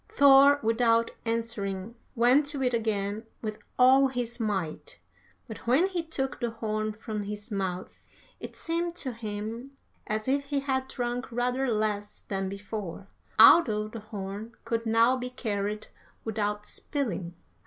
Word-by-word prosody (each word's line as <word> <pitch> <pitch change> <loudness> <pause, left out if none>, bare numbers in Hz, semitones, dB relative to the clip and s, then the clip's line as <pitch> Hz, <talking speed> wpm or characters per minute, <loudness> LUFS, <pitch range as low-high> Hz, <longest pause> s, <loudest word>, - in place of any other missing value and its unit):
"Thor, 280 +1 +7
without 230 0 +3
answering, 225 -3 -2 0.2
went 255 +5 +4
to 285 -3 -1
it 250 -1 +1
again 215 -2 -1 0.2
with 215 -1 -4 0.2
all 265 +2 +6
his 245 -2 -4
might, 205 - -3 0.5
but 225 -1 -9
when 275 +10 +4
he 360 -3 -1
took 275 -5 -3
the 240 - -1
horn 215 -1 -2
from 210 -1 -5
his 210 +2 -7
mouth 185 -2 -2 0.5
it - - -8
seemed 335 +1 -2
to 275 -7 -2
him 225 +4 -6 0.3
as 215 +2 -2
if 280 +2 +1
he 280 0 -1
had 265 -1 -1
drunk 245 -1 -3
rather 250 +3 0
less 210 -1 -2
than 195 -1 -3
before, 200 -1 -6 0.3
although 215 -10 +7
the 225 +1 -7
horn 210 +1 -7
could 230 0 -1
now 230 +3 +4
be 250 0 -4
carried 210 -3 -3 0.4
without 210 -1 -2
spilling. 195 - -3
230 Hz, 145 wpm, -28 LUFS, 210-260 Hz, 0.5 s, Thor